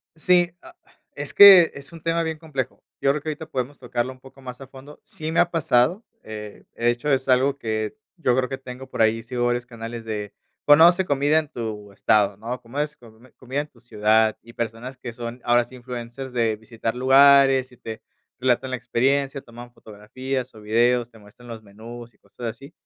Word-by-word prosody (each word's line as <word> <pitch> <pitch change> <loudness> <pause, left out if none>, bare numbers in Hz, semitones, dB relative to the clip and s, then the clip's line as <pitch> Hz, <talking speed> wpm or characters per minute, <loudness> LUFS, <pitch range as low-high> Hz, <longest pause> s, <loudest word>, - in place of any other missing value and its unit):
Sí, 175 +2 +3
ah, 340 - -15 0.4
es - - -5
que 190 -5 +9
es 140 +2 -10
un 165 -1 -12
tema 165 0 +1
bien 160 -1 -3
complejo, 150 -6 -5 0.2
yo 135 - +2
creo 145 +2 +1
que 155 - -3
ahorita 155 +1 -6
podemos 130 0 -4
tocarlo 125 0 -3
un 130 - -21
poco 135 +1 -17
más 125 0 -9
a 135 - -9
fondo, 135 +3 -14
sí 155 0 -6
me 165 - +1
ha - - +4
pasado, 165 - +1 0.2
eh, 105 -1 -9
de 120 +1 +1
hecho, 120 +5 -4
es 135 -1 +1
algo 135 +2 +3
que 110 - -3 0.2
yo 125 -7 +1
creo 130 0 +1
que 135 +1 -6
tengo 130 0 -9
por 130 - -3
ahí, 110 +1 +2
sigo 120 0 -2
varios 120 0 -1
canales 115 -1 -8
de: 105 -2 -5 0.4
"Conoce 170 +5 +7
comida 145 +1 +2
en 155 - -5
tu 110 -5 -6
estado", 100 -1 +2
¿no?, 120 +4 -6
¿cómo 120 +3 -11
es?, 150 0 -2
com 115 -2 -18
comida 130 +3 -3
en 150 - -9
tu - - -24
ciudad 110 -1 +2
y 115 +1 -15
personas 115 +3 -5
que 125 -2 -8
son, 120 +1 -7
ahora 120 0 +3
sí, 120 - -17
influencers 125 +1 -7
de 115 -3 0
visitar 115 +1 -5
lugares 135 0 +5
y 125 - -18
te 110 -1 -8 0.4
relatan 125 +1 +1
la 130 - -2
experiencia, 135 +3 0
toman 120 0 -13
fotografías 125 +5 -6
o 110 - -14
videos, 120 +3 +2
te 115 - -18
muestran 105 +3 -17
los 115 -2 -9
menús 115 +3 -11
y - - -33
cosas 100 +4 -11
así, 120 +6 -8
125 Hz, 205 wpm, -23 LUFS, 115-140 Hz, 0.4 s, que